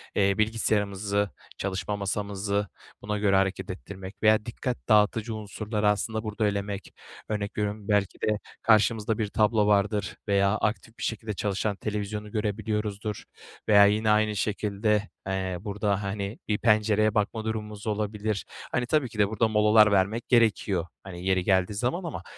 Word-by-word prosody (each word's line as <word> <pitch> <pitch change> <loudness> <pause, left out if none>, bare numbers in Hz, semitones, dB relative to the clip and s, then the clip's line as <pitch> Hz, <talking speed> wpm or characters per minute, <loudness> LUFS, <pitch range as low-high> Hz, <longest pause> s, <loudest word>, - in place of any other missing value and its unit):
eee, 100 0 +3
bilgisayarımızı, 105 -2 0 0.3
çalışma 95 +1 -2
masamızı 100 0 -2 0.3
buna 105 0 -2
göre 100 -2 +2
hareket 95 -1 0
ettirmek 95 +1 -9
veya 110 0 +4
dikkat 120 +1 -3
dağıtıcı 110 +1 +3
unsurları, 105 0 -1
aslında, 110 +2 -1
burada 105 0 -1
elemek... 100 0 -3 0.4
Örnek 105 -1 -3
veriyorum, 105 0 -2
belki 105 -2 +1
de 105 -1 +1 0.2
karşımızda 110 0 +3
bir 110 - 0
tablo 105 0 +2
vardır 100 -2 +1
veya 100 0 +3
aktif 110 +2 -2
bir - - -7
şekilde 110 -1 -3
çalışan 100 +1 -1
televizyonu 105 0 -4
görebiliyoruzdur 105 -1 -2 0.4
veya 100 -1 +8
yine 105 +2 +2
aynı 105 0 +3
şekilde, 105 0 0 0.2
eee, 95 -1 -2
burada, 105 -1 -1
hani, 100 +1 -3
bir 105 - +1
pencereye 110 -1 +3
bakma 110 +1 0
durumumuz 105 -1 -4
olabilir. 105 -1 -2 0.3
Hani, 125 0 0
tabii 140 -2 +1
ki 110 - -9
de 100 - +5
burada 110 +1 +1
molalar 105 0 +5
vermek 100 +4 +1
gerekiyor, 105 -7 +2 0.2
hani, 90 -2 -8
yeri 95 -1 +2
geldiği 95 +1 +2
zaman 125 - -1
ama 170 - -5
105 Hz, 145 wpm, -27 LUFS, 100-110 Hz, 0.4 s, veya